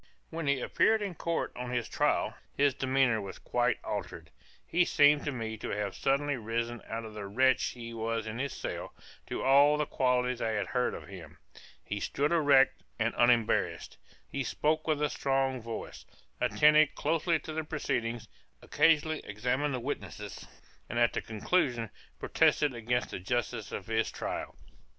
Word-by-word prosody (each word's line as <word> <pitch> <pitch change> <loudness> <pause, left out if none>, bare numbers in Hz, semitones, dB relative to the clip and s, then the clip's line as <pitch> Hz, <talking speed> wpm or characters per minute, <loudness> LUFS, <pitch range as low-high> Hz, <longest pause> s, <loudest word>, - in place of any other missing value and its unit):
When 165 -2 -4
he 140 -1 +2
appeared 220 - +2
in 195 -3 -3
court 170 0 -2
on 125 0 -5
his 120 -1 -1
trial, - - +1 0.2
his 140 -1 +4
demeanor 130 -4 +2
was 100 -1 -7
quite - - 0
altered; - - -5 0.3
he 175 +1 +3
seemed 145 -3 +4
to 145 - 0
me 110 -4 -4
to - - -6
have 100 -1 -2
suddenly 140 +1 +1
risen 115 +1 -3
out 115 0 -4
of 110 - -9
the 105 -2 -6
wretch 130 +6 +3
he 115 -1 -6
was 115 0 -2
in 110 +2 -5
his 140 +1 -2
cell, - - -6 0.3
to - - -3
all 140 +3 +6
the 150 - 0
qualities 125 -2 0
I 110 -1 0
had 105 - 0
heard 125 -1 -1
of - - -9
him; 90 -6 -11 0.5
he 105 - -4
stood 145 +8 -1
erect 145 -5 +4 0.2
and - - 0
unembarrassed; 120 -2 +2 0.3
he 140 - -3
spoke 155 +4 0
with 150 -2 +1
a 150 - +2
strong 135 -2 0
voice, 115 0 -7 0.4
attended 150 0 +4
closely 165 +2 +1
to 155 0 -8
the 160 0 -2
proceedings, 120 -7 -2 0.4
occasionally 155 -1 +3
examined 125 +7 -1
the - - -3
witnesses, 105 - -6 0.4
and 120 - -3
at 120 -1 +3
the - - -1
conclusion 115 - 0 0.3
protested 145 -3 +2
against 120 +1 -1
the - - -4
justice 115 +2 -2
of 95 - -5
his 110 0 0
trial. - - -5
125 Hz, 170 wpm, -30 LUFS, 115-145 Hz, 0.5 s, all